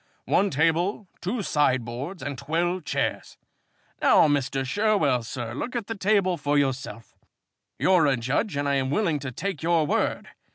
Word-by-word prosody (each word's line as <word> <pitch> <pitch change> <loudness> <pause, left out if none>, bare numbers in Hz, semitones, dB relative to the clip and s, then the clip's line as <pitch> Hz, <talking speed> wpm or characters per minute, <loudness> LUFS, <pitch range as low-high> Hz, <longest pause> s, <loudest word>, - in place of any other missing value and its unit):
One 200 - +2
table, 170 +7 0
two 210 +4 -2
sideboards, 135 - -1
and 145 0 -4
twelve 170 +5 -1
chairs. - - -2 0.6
Now, - - +6
Mr. 135 -2 0
Sherwell, 165 - +2
sir, 115 0 -6
look 240 - -5
at 235 -3 -2
the 225 - -4
table 195 -3 +1
for 145 -1 0
yourself. 130 -5 -2 0.6
You're 180 -5 +4
a 135 -2 +2
judge 135 - -1
and 145 0 -1
I 140 0 +2
am 130 -1 -1
willing 165 -2 +1
to 135 -2 -5
take 190 +4 -4
your 165 -1 +2
word. - - -1
150 Hz, 160 wpm, -25 LUFS, 135-190 Hz, 0.6 s, Now